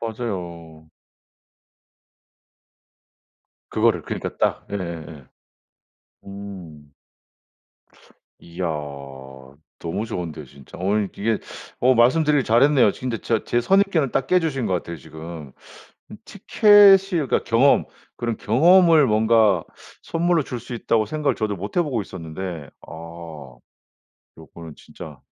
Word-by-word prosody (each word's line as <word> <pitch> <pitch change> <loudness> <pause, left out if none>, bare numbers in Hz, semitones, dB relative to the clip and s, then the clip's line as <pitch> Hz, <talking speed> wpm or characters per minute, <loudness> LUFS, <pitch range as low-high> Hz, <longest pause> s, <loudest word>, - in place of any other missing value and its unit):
맞아요. 85 -9 -6 2.8
그거를. - - +1
그러니까 - - -6
딱. - - -1
예예예. 85 -7 -7 1.0
음. 90 -7 -11 1.5
이야. 85 +2 -7 1.2
너무 100 +7 -4
좋은데 85 -8 -6
진짜. 70 0 -15
어 100 +4 0
이게 105 +2 -2 0.4
어 130 +1 +4
말씀드리기를 145 +4 +3
잘했네요. 125 +1 +4
진짜 125 -3 -5
저 115 -2 0
제 120 - 0
선입견을 190 -2 +2
딱 135 - -1
깨주신 160 -9 0
것 95 - 0
같아요 85 -1 -4
지금. 80 -2 -10 0.6
음 - - -9
티켓이 205 -2 +6 0.2
그러니까 155 -7 0
경험 125 +5 +3 0.3
그런 115 -2 -3
경험을 165 0 +5
뭔가 110 -4 +3 0.4
선물로 170 0 0
줄 125 - -6
수 120 - -8
있다고 115 -1 0
생각을 150 -3 -1
저도 105 -2 -2
못 100 - -8
해 175 - +4
보고 135 -8 -2
있었는데 85 -3 -7 0.2
아 - - -10 1.5
요거는 80 0 -12
진짜 75 -5 -12
110 Hz, 235 characters per minute, -22 LUFS, 85-135 Hz, 2.8 s, 티켓이